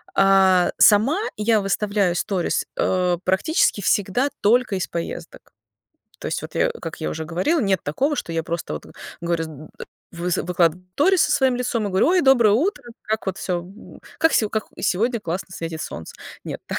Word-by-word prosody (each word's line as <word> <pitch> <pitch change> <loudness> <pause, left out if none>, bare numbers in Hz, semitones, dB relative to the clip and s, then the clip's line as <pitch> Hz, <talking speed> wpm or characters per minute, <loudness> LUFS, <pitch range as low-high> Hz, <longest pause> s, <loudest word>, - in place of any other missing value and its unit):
Э, 190 -2 +4
сама 225 - +5 0.2
я 215 0 +2
выставляю 200 -1 0
сторис, 180 0 -1
э, 180 -1 +1
практически 195 - +1
всегда 205 +8 +1
только 235 0 +3
из 185 - -1
поездок. 170 0 -7 0.7
То - - -6
есть - - -3
вот - - -9
я - - +2
как - - -8
я 75 - -2
уже 160 - -5
говорила, 185 - 0
нет 195 -6 +1
такого, 270 - 0
что 225 - -4
я 165 -1 -2
просто 170 - -4
вот 75 - -7
вы - - -15 0.3
говорю 170 -1 -1
зд 155 -1 -11 0.4
выс 175 0 -2
выкладываю 175 0 0
сторис 360 - +3
со - - +1
своим 260 -2 +2
лицом 240 -3 -1
и - - -1
говорю: 190 0 +2
"Ой, 365 +1 +4
доброе 255 -8 +5
утро, 295 - 0 0.2
как 220 0 -2
вот 190 0 -3
всё, 180 -2 -2
м, 190 +5 -14 0.2
как 325 - +4
всё, 215 - +2
как 220 -2 -2
и - - -9
сегодня 230 +6 +1
классно 180 -2 -4
светит 165 -2 -5
солнце". 80 - -8 0.3
Нет, - - -6
так - - -3
195 Hz, 190 wpm, -22 LUFS, 175-235 Hz, 0.7 s, сама